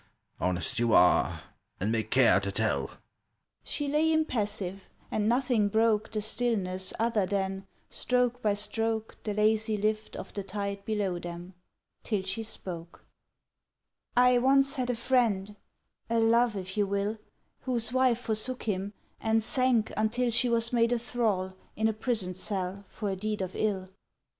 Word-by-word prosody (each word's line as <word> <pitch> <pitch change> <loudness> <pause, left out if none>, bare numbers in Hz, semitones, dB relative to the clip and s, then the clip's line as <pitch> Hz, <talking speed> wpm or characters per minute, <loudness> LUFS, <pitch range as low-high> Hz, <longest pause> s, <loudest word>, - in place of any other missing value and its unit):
Honest 90 0 -1
you 120 -1 +2
are, 90 - +4 0.4
and 100 +4 0
may 115 -1 +1
care 110 -2 +4
to 100 0 -3
tell." 95 -11 0 0.7
She 290 - -2
lay 305 +3 +2
impassive, 210 - -1 0.2
and 215 0 +1
nothing 245 -4 +2
broke 215 0 +2
The 215 -1 -2
stillness 200 -5 +1
other 225 -4 +1
than, 195 0 -2 0.2
stroke 250 -1 0
by 210 -2 +2
stroke, 225 +1 -1
The 210 -2 -3
lazy 215 +1 +2
lift 215 +1 -1
Of - - -8
the 200 - -3
tide 200 +1 -4
below 200 -5 -1
them; 175 +2 -8 0.5
till 210 -4 -2
she 190 +4 -3
spoke: 175 -6 -6 1.1
"I 250 0 +6
once 275 +2 +3
had 250 -1 -1
a 245 - +1
friend—a 225 -2 -2
Love, 230 0 +3
if 190 -1 -5
you 205 -2 +1
will— 200 +2 -1 0.4
Whose 245 -2 0
wife 255 -2 +3
forsook 230 +3 -1
him, 200 -1 -2 0.3
and 225 0 +1
sank 250 -2 +2
until 235 +3 +1
She 235 +2 +3
was 235 0 +2
made 235 0 +3
a 245 - +3
thrall 220 -6 -1 0.2
In 220 +1 +1
a 220 - +1
prison 215 -4 -1
cell 190 +1 -4
for 205 -3 -4
a - - -2
deed 210 +1 -2
of 185 - -6
ill 195 -3 -1
215 Hz, 155 wpm, -29 LUFS, 190-235 Hz, 1.1 s, I